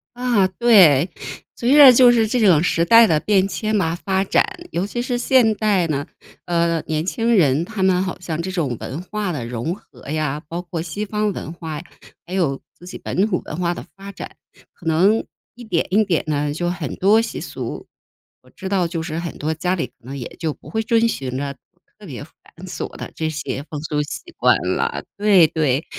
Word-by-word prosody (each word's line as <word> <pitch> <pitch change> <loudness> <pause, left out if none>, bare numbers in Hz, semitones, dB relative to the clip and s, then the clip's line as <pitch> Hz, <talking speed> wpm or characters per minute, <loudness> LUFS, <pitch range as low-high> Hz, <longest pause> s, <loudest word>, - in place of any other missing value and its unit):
啊， 240 -6 +2
对。 185 - +5 0.5
随 245 +3 +1
着 280 -4 +10
就 245 0 +7
是 230 -2 +3
这 245 +3 0
种 180 -8 +5
时 170 -1 +1
代 230 +6 +7
的 155 -5 +2
变 195 -2 +2
迁 215 +3 -3
嘛 170 -5 +1
发 190 +2 -1
展， 195 - +3 0.3
尤 170 +3 -1
其 240 +4 -4
是 245 0 -2
现 240 -2 +3
代 200 -5 +1
呢， 145 -2 -2 0.4
呃， 170 -1 +1
年 155 0 -1
轻 230 +5 0
人 150 -3 +3
他 215 +1 -6
们 185 -1 +3
好 185 -1 -5
像 165 -3 -4
这 185 +2 -4
种 155 -9 -1
文 145 +6 -6
化 210 0 -3
的 140 -8 -4
融 120 +7 -3
合 200 - -15
呀， 150 -1 -2
包 170 +1 -4
括 175 -2 -5
西 175 +6 -4
方 210 0 -1
文 165 - -6
化， 160 -3 -6 0.4
还 180 - -9
有 160 -8 0 0.2
自 175 - -15
己 180 - -8
本 195 +4 -1
土 185 -5 -1
文 - - -6
化 175 -1 0
的 - - -8
发 195 0 -9
展， - - -9 0.4
可 175 - -18
能 185 +7 +3 0.3
一 240 - -11
点 180 -7 -1
一 215 +3 +4
点 180 -6 0
的， 145 -1 -1
就 175 +3 -2
很 175 -6 -4
多 210 +4 +4
习 230 - -5
俗。 - - -6 0.5
我 - - -22
知 190 - -8
道 190 -2 +1
就 165 -1 -4
是 160 -1 -4
很 170 -1 -6
多 155 +2 -2
家 180 +3 -1
里 180 - -2
可 - - -33
能 130 +3 -8
也 125 - -5
就 160 -3 -2
不 - - -15
会 220 0 -1
遵 230 +1 +3
循 130 - -3
着 140 0 -3 0.5
特 - - -13
别 - - -8
繁 - - -25 0.3
琐 - - -6
的 - - -7
这 160 -1 -2
些 150 -3 -4
风 150 - -5
俗 150 -2 -1
习 145 - -6 0.2
惯 - - +4 0.2
了， - - -2
对 200 -5 +5
对。 150 -2 0
180 Hz, 230 characters per minute, -20 LUFS, 155-210 Hz, 0.5 s, 着